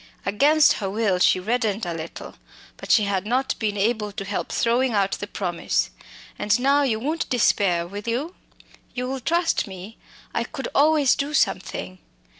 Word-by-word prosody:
Against 290 +10 +4
her 195 - -2
will 200 -3 0
she 185 - +4
reddened 220 0 -1
a 175 - -3
little; 165 0 -7 0.4
but - - -10
she 215 - +5
had 200 0 -1
not 260 +3 +1
been 210 -2 -1
able 210 0 0
to 195 0 -6
help 200 +1 -3
throwing 240 +1 +1
out 200 -2 +1
the 205 - -4
promise. 180 -4 -1 0.5
"And 210 +2 +2
now, 280 +3 +3
you 235 -6 +1
won't 310 +7 -2
despair, 195 -7 +2
will 205 +5 -8
you? 270 +10 -2 0.6
You'll 255 +2 -3
trust 330 +4 0
me? 190 +3 -10 0.3
I 235 - 0
could 270 +2 -6
always 295 -2 +4
do 290 +2 -2
something." 185 -4 -1
220 Hz, 165 wpm, -23 LUFS, 195-265 Hz, 0.6 s, she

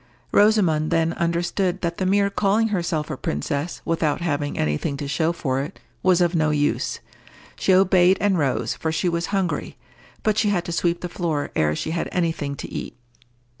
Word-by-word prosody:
Rosamond 185 -8 +3
then 165 0 +1
understood 175 +2 -1
that 170 -1 -2
the 185 - 0
mere 200 +1 +2
calling 210 +3 +2
herself 170 -6 -1
a 140 - -4
princess, 140 - -3
without 165 -3 0
having 145 -4 -2
any 75 -1 +1
thing 140 - -3
to 145 - -4
show 160 +4 +1
for 135 -6 -1
it, 150 +7 -7 0.2
was 185 -1 +3
of 175 0 +2
no 160 -2 +2
use. 145 -1 0 0.5
She - - +1
obeyed 185 -1 +5
and 205 -2 +2
rose, 140 -4 0
for 160 - -3
she 160 +3 0
was 170 0 -1
hungry; 195 -4 -2 0.5
but 215 -1 +2
she 215 -2 +2
had 180 -4 0
to - - -4
sweep 170 0 0
the 180 - -3
floor 165 -4 -2
ere 75 0 +2
she 155 - -3
had 165 0 -2
any 170 -2 +1
thing 145 -3 -4
to - - -8
eat. - - -6
170 Hz, 195 wpm, -23 LUFS, 150-185 Hz, 0.5 s, obeyed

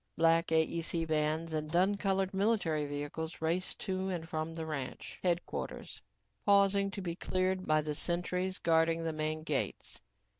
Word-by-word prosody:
Black 165 +1 +4
AEC 165 +1 +1
vans 155 +1 0
and 155 -1 -2
dun 185 +5 +3
colored 195 -1 0
military 190 -7 +1
vehicles 145 +3 -4
raced 170 +3 -1
to 190 0 -1
and 170 -3 -3
from 160 0 -3
the 165 -1 -4
ranch 145 -5 -5
headquarters, 175 -1 -2 0.4
pausing 200 -1 +4
to 195 0 -6
be 170 -2 -3
cleared 185 +1 0
by 155 0 +4
the 150 0 -3
sentries 180 +3 -1
guarding 165 0 +2
the 165 -1 -1
main 155 0 -2
gates. 150 -4 -3
165 Hz, 150 wpm, -33 LUFS, 155-185 Hz, 0.4 s, Black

